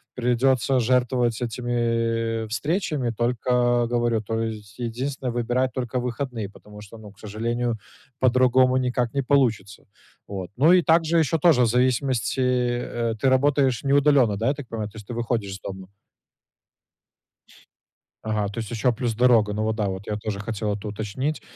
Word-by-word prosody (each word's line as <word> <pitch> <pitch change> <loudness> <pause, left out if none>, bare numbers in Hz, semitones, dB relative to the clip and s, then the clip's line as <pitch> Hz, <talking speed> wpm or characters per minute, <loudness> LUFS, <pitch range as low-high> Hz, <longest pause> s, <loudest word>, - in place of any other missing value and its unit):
придется 125 +1 +2
жертвовать 125 -1 +1
этими, 115 -1 -1
э, - - -6
встречами. 145 - -1
Только 120 +1 +1
говорю, 120 -2 +1
то 115 +1 -3
есть 105 -3 -7
единственное- 125 +2 -3
выбирать 125 +2 0
только 125 -1 -2
выходные, 120 -3 -4
потому 105 0 -14
что, 105 +2 -12
ну, 105 -2 -12
к 100 - -24
сожалению, 115 +2 -2 0.4
по-другому 130 0 +4
никак 125 -2 -1
не 140 - 0
получится. 115 -8 +1 0.4
Вот. 95 -3 -6
Ну 155 +7 +5
и 185 - +6
также 165 0 +3
ещё 160 +1 +1
тоже 155 -5 +5
в - - +3
зависимости, 125 0 +1
э, 120 -2 0
ты 135 - +3
работаешь 130 -2 +2
не 140 0 +1
удаленно, 140 -7 +4
да, 110 +3 -1
я 140 - +3
так 145 -3 -9
понимаю? 110 -2 -4
То 110 - -14
есть 105 -2 -11
ты - - -4
выходишь 115 -3 -2
из 95 - -7
дома. 95 -1 -8 2.4
Ага, 110 -2 -1
то 100 - -9
есть 110 -1 -5
еще 120 +2 +1
плюс 120 0 -2
дорога. 115 -3 +3
Ну 105 +1 -2
вот, 110 0 0
да, 105 -2 -1
вот 95 +1 -5
я 105 - -2
тоже 105 -1 -4
хотел 105 0 -3
это 100 +1 -6
уточнить. 110 +8 -3
120 Hz, 165 wpm, -24 LUFS, 110-130 Hz, 2.4 s, и